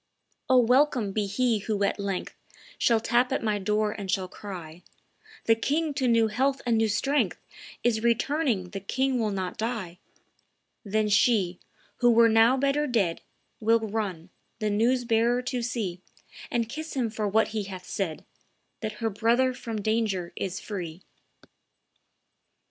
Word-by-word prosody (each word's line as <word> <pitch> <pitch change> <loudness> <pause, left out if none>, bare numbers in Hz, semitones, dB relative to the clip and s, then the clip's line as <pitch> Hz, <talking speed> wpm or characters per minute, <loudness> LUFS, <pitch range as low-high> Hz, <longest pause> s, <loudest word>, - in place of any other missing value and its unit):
"O, 260 - +6
welcome 250 -3 +3
be 205 0 -1
he 230 +2 +1
who 205 0 -1
at 200 - 0
length 200 -2 -3 0.5
Shall 230 -2 +3
tap 240 +3 +2
at 265 - -1
my 210 -2 0
door 210 +2 0
and 200 -2 -7
shall 185 0 0
cry, 180 -4 -9 0.6
'The 225 - +6
king 300 +5 0
to 265 -2 0
new 230 -2 +4
health 265 +5 0
and 235 -2 +2
new 225 0 +3
strength 275 +7 0 0.4
Is 230 -2 +2
returning; 235 - +1
the 195 - -4
king 260 +6 0
will 220 -2 +1
not 190 -2 -3
die!' 215 -7 -3 0.8
Then 215 0 0
she, 200 -4 +2 0.4
who 240 - +4
were 230 0 +6
now 225 +4 +5
better 280 +2 +1
dead, 200 -10 0 0.4
Will 225 +1 +4
run, 200 -6 -4 0.3
the 215 -2 -1
news 240 +5 +2
bearer 235 +2 +2
to 250 -1 -2
see, 215 -7 -3 0.5
And 235 -2 0
kiss 310 +6 -6
him 240 -4 0
for 215 -1 -2
what 220 +2 +2
he 215 -2 -3
hath 185 -2 -8
said, 170 -6 -4 0.5
That 215 -1 -4
her 225 - +2
brother 235 +5 +2
from 230 -4 -5
danger 210 -5 0
is 190 0 -3
free." 180 -4 -6
220 Hz, 155 wpm, -27 LUFS, 200-245 Hz, 0.8 s, O